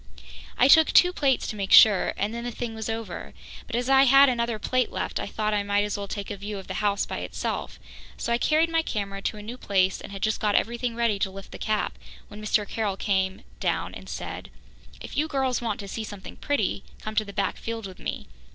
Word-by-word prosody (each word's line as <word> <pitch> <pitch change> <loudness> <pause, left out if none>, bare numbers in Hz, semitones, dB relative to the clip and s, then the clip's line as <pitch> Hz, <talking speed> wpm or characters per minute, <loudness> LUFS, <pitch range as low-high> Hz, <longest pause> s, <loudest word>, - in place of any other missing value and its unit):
I 255 - +6
took 320 +3 +7
two 360 0 +6
plates 275 -6 +1
to - - -4
make 195 -2 -4
sure 210 -4 +7
and 205 +2 -1
then 235 0 -4
the 245 - -3
thing 235 -1 -5
was 220 0 -5
over, 225 0 -5 0.3
but - - -4
as 245 +1 -1
I 270 0 +6
had 275 +1 +7
another 235 -2 0
plate 255 +4 0
left - - -3
I - - -3
thought 215 -1 -1
I 205 - +2
might 200 0 +1
as 205 -1 -2
well 200 -1 -4
take 200 0 -5
a 205 - -5
view 205 +1 -5
of 190 - -8
the - - -5
house 200 -1 +1
by - - -5
itself, - - -4 0.4
so 235 - -1
I 235 - +1
carried 320 +5 +2
my 330 0 +3
camera 200 -8 -4
to 215 - -2
a 210 - -8
new 240 +4 -7
place 190 -2 +1
and - - -9
had 195 -1 -6
just 215 - +1
got 210 -1 +1
everything 235 0 0
ready 230 -4 +1
to 195 - 0
lift 195 0 -11
the - - -9
cap 215 -1 -1 0.3
when 210 0 -10
Mr. 210 -1 +1
Carroll 210 -4 -2
came 190 -2 0 0.2
down - - -1
and - - -10
said: - - -6 0.5
"If - - -9
you 300 +2 +1
girls 265 -4 0
want 225 -3 -2
to 200 - -8
see 220 +3 -4
something 205 -3 -9
pretty, 285 0 -1 0.2
come 215 - -6
to 215 0 +2
the 200 - -9
back 200 0 -1
field 225 -1 -5
with 190 -1 -9
me. - - -4
215 Hz, 245 wpm, -26 LUFS, 200-245 Hz, 0.5 s, took